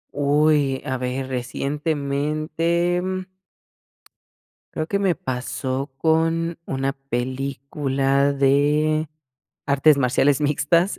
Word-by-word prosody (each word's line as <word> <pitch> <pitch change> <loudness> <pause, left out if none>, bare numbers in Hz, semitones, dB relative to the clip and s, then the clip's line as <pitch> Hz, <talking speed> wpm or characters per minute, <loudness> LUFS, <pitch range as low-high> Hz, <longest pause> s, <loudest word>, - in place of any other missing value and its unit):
Uy, 145 -1 +2
a 130 -2 -2
ver, 130 +1 -3
recientemente, 150 +6 -1
mm 185 0 -3 1.5
creo 155 0 -3
que 200 - 0
me 195 -3 +2
pasó 135 -3 -4
con 165 +1 +1
una 135 0 -2
película 135 +1 -1
de 150 +3 +2 0.6
artes 140 +1 +4
marciales 140 +2 +2
mixtas, 170 +6 +2
145 Hz, 85 wpm, -22 LUFS, 135-160 Hz, 1.5 s, artes